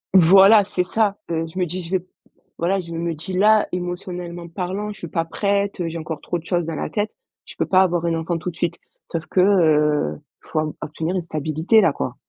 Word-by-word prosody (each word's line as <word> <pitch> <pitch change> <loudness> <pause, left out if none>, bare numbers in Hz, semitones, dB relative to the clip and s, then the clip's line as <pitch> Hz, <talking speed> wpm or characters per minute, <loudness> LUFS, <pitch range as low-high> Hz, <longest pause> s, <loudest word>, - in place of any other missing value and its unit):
Voilà 195 +4 +8
c'est 185 -2 -1
ça, 205 +1 0
heu, 165 0 -1
je 165 +3 -12
me 185 - +1
dis 180 +2 -4
je 165 - -9
vais 190 - +3
p 180 - -19 0.5
voilà 185 +3 +1
je 170 -2 -7
me 165 0 -2
dis 165 +5 -7
là: 210 +3 +4
«Émotionnellement 175 -1 -5
parlant, 185 +4 -4
je - - -15
suis 170 - -6
pas 165 +1 -1
prête, 200 +2 -1
heu, 170 - -1
j'ai 165 - -5
encore 160 -1 -5
trop 175 - -2
chose 175 +1 -1
dans 165 0 -4
la - - -3
tête, 210 0 -1 0.3
je - - -12
peux - - 0
pas 185 0 +4
avoir 175 -2 +1
un 170 - +1
enfant 165 +1 -2
tout 165 +2 -4
de - - -20
suite». 170 -1 -2 0.3
Sauf 165 -2 -3
que, 185 - -1
heu, 150 - +3
il - - -27
faut 155 - +1
av 155 0 -1
obtenir 160 +4 -3
une 180 - -1
stabilité 160 +6 +2
là, 165 - +4
quoi. 125 - -4
175 Hz, 240 wpm, -22 LUFS, 165-190 Hz, 0.5 s, Voilà